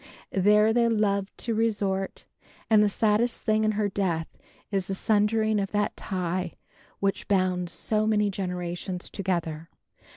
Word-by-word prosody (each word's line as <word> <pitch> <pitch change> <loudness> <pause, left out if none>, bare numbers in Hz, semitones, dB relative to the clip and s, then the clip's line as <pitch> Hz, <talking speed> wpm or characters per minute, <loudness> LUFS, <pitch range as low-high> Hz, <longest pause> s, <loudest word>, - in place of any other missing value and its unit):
There 210 +3 +4
they 235 0 +3
loved 200 -3 0
to 230 - 0
resort 205 -4 -1 0.5
and 215 -1 +7
the 210 - +4
saddest 220 +3 +1
thing 215 -1 +2
in 215 0 +2
her 210 0 0
death 185 -5 -1 0.5
is 195 -3 -1
the 195 - -2
sundering 215 +1 +2
of 195 -1 -1
that 205 0 0
tie 180 -1 -3 0.5
which 195 0 -1
bound 185 -3 +1
so 215 +4 0
many 210 -2 +2
generations 180 -1 -4
together. 165 -4 -3
200 Hz, 140 wpm, -27 LUFS, 185-215 Hz, 0.5 s, and